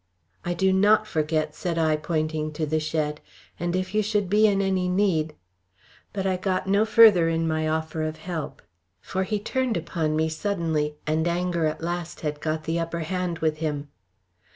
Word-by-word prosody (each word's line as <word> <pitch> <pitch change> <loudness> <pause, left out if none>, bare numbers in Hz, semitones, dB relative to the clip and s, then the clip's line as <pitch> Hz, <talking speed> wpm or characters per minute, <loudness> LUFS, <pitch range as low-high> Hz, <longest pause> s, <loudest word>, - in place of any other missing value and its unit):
"I 175 0 -2
do 190 +2 +2
not 210 +3 +4
forget," 155 -3 -1
said 170 0 -3
I 160 -1 +3
pointing 155 0 -2
to 155 +1 -2
the 155 +1 0
shed. 155 -1 -2 0.4
"And 175 +1 -1
if 185 +1 -2
you 215 - +3
should 205 -3 -1
be 215 +1 +5
in 200 -2 +2
any 190 -2 +1
need 180 -5 +1 0.4
" 95 - -30
But 195 -1 -3
I 190 -1 +1
got 185 0 -1
no 200 +3 +3
further 215 -7 +7
in 165 0 0
my 155 0 0
offer 160 0 -2
of 155 0 -2
help; 165 -4 -6 0.4
for 190 - -3
he 210 +2 -1
turned 255 +1 -1
upon 160 -2 -1
me 160 +1 +2
suddenly, 160 -4 -1
and 155 +2 +1
anger 170 -1 0
at 155 0 -4
last 175 0 -4
had 150 -1 -3
got 155 0 -2
the 165 +1 -1
upper 165 0 -3
hand 180 +1 -2
with 155 -1 +1
him. 150 -2 -3
165 Hz, 190 wpm, -25 LUFS, 155-190 Hz, 0.4 s, further